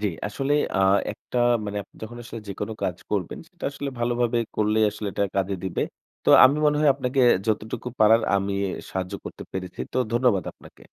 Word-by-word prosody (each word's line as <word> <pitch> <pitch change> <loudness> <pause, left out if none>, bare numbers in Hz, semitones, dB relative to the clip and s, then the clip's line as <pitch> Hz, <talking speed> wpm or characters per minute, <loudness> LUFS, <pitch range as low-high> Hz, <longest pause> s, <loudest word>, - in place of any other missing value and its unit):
জ্বি, 105 - +1 0.2
আসলে 135 +7 -2 0.2
আ - - +2 0.3
একটা 125 - -5 0.3
মানে 105 0 -4
আপনি - - -25
যখন 115 +2 -7
আসলে 115 -1 -7
যেকোনো 100 +3 -4
কাজ 90 -2 -1
করবেন 100 -5 -2
সেটা 175 -1 -12
আসলে 140 0 -5
ভালোভাবে 120 0 +1 0.2
করলেই 110 +1 +3
আসলে 105 0 -6
এটা 100 - 0
কাজে 95 0 0
দিবে। 95 -3 -1 0.4
তো - - +1 0.2
আমি 140 +3 +5
মনে 150 0 +3
হয় 150 -2 +5
আপনাকে 130 0 -1 0.3
যতটুকু 110 +2 -2
পারার 110 +1 +6
আমি 100 0 -1 0.4
সাহায্য 95 -1 -3
করতে - - -8
পেরেছি। 95 -1 -6
তো - - 0
ধন্যবাদ 120 -7 +2
আপনাকে। - - -18
110 Hz, 180 wpm, -25 LUFS, 100-125 Hz, 0.4 s, পারার